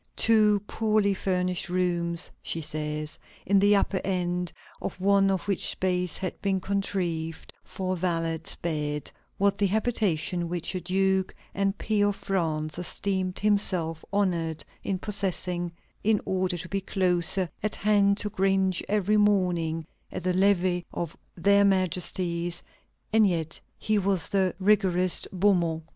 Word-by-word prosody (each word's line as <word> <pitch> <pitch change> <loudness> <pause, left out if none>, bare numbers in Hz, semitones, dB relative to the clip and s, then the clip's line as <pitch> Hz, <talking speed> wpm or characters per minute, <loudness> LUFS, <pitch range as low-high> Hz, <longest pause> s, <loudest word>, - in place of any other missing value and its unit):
"Two 215 -2 +5
poorly 215 -2 +1
furnished 185 -2 -1
rooms," 175 -1 0
she 165 - -3
says, 150 0 -4 0.3
"in 200 +1 +4
the 205 +1 +5
upper 195 -1 +1
end 180 -2 -1 0.3
of - - -5
one 195 +1 +4
of 190 -2 0
which 195 -3 0
space 180 -2 0
had 185 -2 -5
been 195 -1 +1
contrived 175 -4 -3
for 185 -1 -3
a - - -1
valet's 165 -2 -1
bed, 150 -3 -3 0.3
was 200 0 +3
the 200 0 +1
habitation 185 -5 0
which 175 +1 -2
a 185 - -3
duke 190 +1 +1 0.2
and 195 0 0
peer 205 -1 +1
of 205 - 0
France 160 -6 -2
esteemed 185 0 -2
himself 185 -6 +1
honored 170 -6 0 0.2
in 195 - -1
possessing, 180 -3 -2 0.3
in 215 -1 +3
order 185 -1 0
to 170 +1 -6
be 195 +2 -2
closer 185 -1 +2
at 215 - -1
hand 200 -1 +3
to 210 - -2
cringe 190 -1 +1
every 210 0 +2
morning 180 -6 +2 0.3
at - - -5
the 185 - +1
levée 185 -2 +2
of 170 -2 -4 0.2
Their 200 +4 +4
Majesties: 180 -2 0 0.5
and 220 -2 +6
yet 165 -3 -2 0.2
he 215 -1 +1
was 190 -4 0
the 190 -2 +1
rigorist 185 -3 +2
Beaumont.... 175 -4 +2
185 Hz, 140 wpm, -27 LUFS, 170-200 Hz, 0.5 s, and